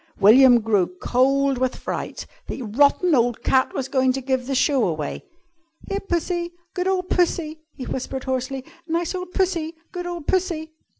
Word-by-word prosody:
William 240 +4 +7
grew 210 -5 +2
cold 270 +1 +2
with 255 0 0
fright. - - -5 0.2
The 260 - -5
rotten 285 - +3
old 240 -3 +2
cat 260 0 +3
was 265 - -2
going 260 -1 +2
to 270 - -3
give 260 -1 -1
the 270 - -1
show 260 -3 +3
away! 155 -4 -4 0.6
"Here, 395 - -2
Pussy! 345 -2 -2 0.2
Good 360 0 -1
ole 380 -1 +1
Pussy!" 340 -3 0 0.2
he 265 - -7
whispered 265 0 -4
hoarsely. 260 0 -3 0.2
"Nice 335 +1 -1
ole 365 0 -4
Pussy! 350 -3 -1 0.2
Good 355 -2 -5
ole 350 -1 -4
Pussy!" 335 -2 -1
275 Hz, 165 wpm, -23 LUFS, 255-345 Hz, 0.6 s, William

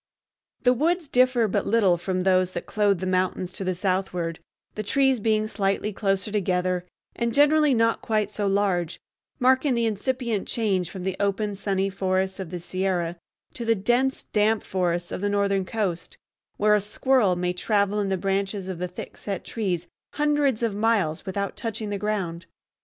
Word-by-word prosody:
The 250 -1 +5
woods 325 +5 +1
differ 250 -3 +3
but - - -1
little 200 -5 +4
from 185 +1 -2
those 185 -1 +2
that - - -4
clothe 205 -4 +1
the - - -2
mountains 185 0 0
to 195 - -5
the 185 -1 -1
southward, 180 -3 -1 0.3
the 215 - -3
trees 265 +4 +2
being 215 0 +1
slightly 205 0 -1
closer 195 0 -1
together 180 -3 0 0.3
and 235 +1 -1
generally 295 -1 +5
not 230 0 +2
quite 215 -2 0
so 205 0 -2
large, 185 -4 0 0.4
marking 260 +1 +3
the 235 -1 +1
incipient 230 0 -1
change 195 -6 0
from 190 -2 -7
the 190 0 -1
open 200 +1 0
sunny 195 -1 -1
forests 190 0 -1
of 190 -4 -5
the 175 +1 -5
Sierra 175 -1 -2 0.4
to 240 - -5
the 230 0 +3
dense 245 +6 +1
damp 215 +1 +2
forests 175 -2 -1
of - - -4
the 205 - 0
northern 200 -1 +1
coast, 190 -6 -3 0.4
where 210 +1 +4
a 210 - +4
squirrel 210 -1 +2
may 180 0 -1
travel 205 +2 +1
in 200 -1 0
the 190 - 0
branches 195 +1 -1
of 185 -3 -5
the 180 - -2
thick 180 - -9
set 195 -3 -4
trees 185 -6 -2 0.3
hundreds 290 -5 +1
of 225 -3 +1
miles 205 -8 0
without 200 +1 -2
touching 220 -2 -4
the 200 - -2
ground. 185 -5 -2
200 Hz, 175 wpm, -25 LUFS, 185-225 Hz, 0.4 s, The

